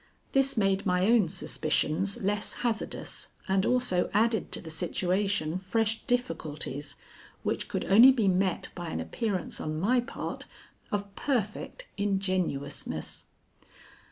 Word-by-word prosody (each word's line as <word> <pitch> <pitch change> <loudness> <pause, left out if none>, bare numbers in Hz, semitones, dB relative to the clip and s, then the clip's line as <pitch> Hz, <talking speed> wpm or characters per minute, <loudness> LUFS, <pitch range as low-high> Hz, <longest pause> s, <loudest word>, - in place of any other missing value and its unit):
This 270 -2 +3
made 195 -2 +2
my 180 -1 +2
own 225 -3 +5
suspicions 190 +4 0
less 205 +2 0
hazardous, 225 -2 -3
and 190 0 +2
also 250 -8 +2
added 225 +1 +2
to - - +1
the 160 - -8
situation 180 0 0
fresh 220 +3 0
difficulties 155 - -2 0.5
which - - -1
could - - -2
only 235 +7 +9
be 230 -6 +2
met 185 -1 +1
by 175 -2 -5
an - - -3
appearance 205 -7 -3
on 155 0 -2
my 240 +8 +3
part 245 +3 -5 0.5
of 200 -1 -3
perfect 255 - -2
ingenuousness. 185 -8 -1
195 Hz, 125 wpm, -29 LUFS, 180-225 Hz, 0.5 s, only